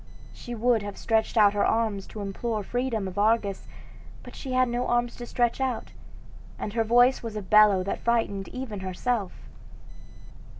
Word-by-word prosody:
She 240 Hz, -, -8 dB
would 235 Hz, 0 st, +2 dB
have 205 Hz, -1 st, -7 dB
stretched 225 Hz, +1 st, 0 dB
out 205 Hz, -2 st, +6 dB
her 205 Hz, -, +1 dB
arms 220 Hz, -4 st, 0 dB
to 215 Hz, -, -8 dB
implore 210 Hz, +2 st, -3 dB
freedom 240 Hz, -2 st, -2 dB
of 190 Hz, +2 st, -5 dB
Argus, 210 Hz, -2 st, +1 dB, 0.6 s
but -, -, -12 dB
she 265 Hz, -2 st, -6 dB
had 255 Hz, 0 st, +3 dB
no 240 Hz, +1 st, -2 dB
arms 240 Hz, 0 st, 0 dB
to 240 Hz, -, -7 dB
stretch 240 Hz, +2 st, 0 dB
out, 260 Hz, -3 st, -2 dB, 0.7 s
and 205 Hz, -, -5 dB
her 225 Hz, -1 st, +1 dB
voice 245 Hz, +3 st, +4 dB
was 225 Hz, -2 st, -6 dB
a 210 Hz, -, -3 dB
bellow 205 Hz, -1 st, +5 dB
that 195 Hz, -, -3 dB
frightened 225 Hz, -5 st, 0 dB
even 250 Hz, -6 st, -6 dB
herself. 190 Hz, +3 st, -2 dB
225 Hz, 170 wpm, -26 LUFS, 205-240 Hz, 0.7 s, out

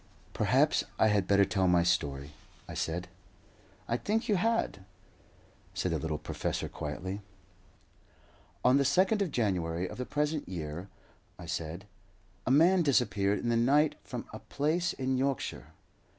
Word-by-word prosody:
"Perhaps -, -, +3 dB
I 110 Hz, -, +4 dB
had 100 Hz, -3 st, +2 dB
better 100 Hz, 0 st, +5 dB
tell 95 Hz, -2 st, +1 dB
my 90 Hz, -1 st, +4 dB
story," 70 Hz, -4 st, 0 dB, 0.4 s
I -, -, -7 dB
said. 85 Hz, +2 st, -2 dB, 0.8 s
"I 120 Hz, -, 0 dB
think 220 Hz, -, -1 dB
you 210 Hz, -, +3 dB
had," 220 Hz, -, 0 dB, 0.9 s
said -, -, -1 dB
the -, -, 0 dB
little 80 Hz, -1 st, -2 dB
professor, -, -, -3 dB
quietly. 95 Hz, +7 st, -5 dB, 1.4 s
"On 125 Hz, +2 st, +6 dB
the 140 Hz, -, +3 dB
2nd 190 Hz, +8 st, +3 dB
of 195 Hz, -, +1 dB
January 90 Hz, -, -1 dB
of -, -, -9 dB
the 125 Hz, -, -3 dB
present 150 Hz, -, -1 dB
year," 85 Hz, +1 st, -5 dB, 0.5 s
I -, -, -9 dB
said, 85 Hz, +3 st, -4 dB, 0.6 s
"a -, -, +2 dB
man 170 Hz, +7 st, +5 dB
disappeared 105 Hz, -, +2 dB
in 120 Hz, -, -1 dB
the 120 Hz, -, +2 dB
night 145 Hz, +6 st, +4 dB
from -, -, -6 dB
a -, -, -6 dB
place 160 Hz, +5 st, -1 dB
in 130 Hz, -1 st, -1 dB
Yorkshire. 135 Hz, -1 st, -2 dB
115 Hz, 150 wpm, -30 LUFS, 90-150 Hz, 1.4 s, On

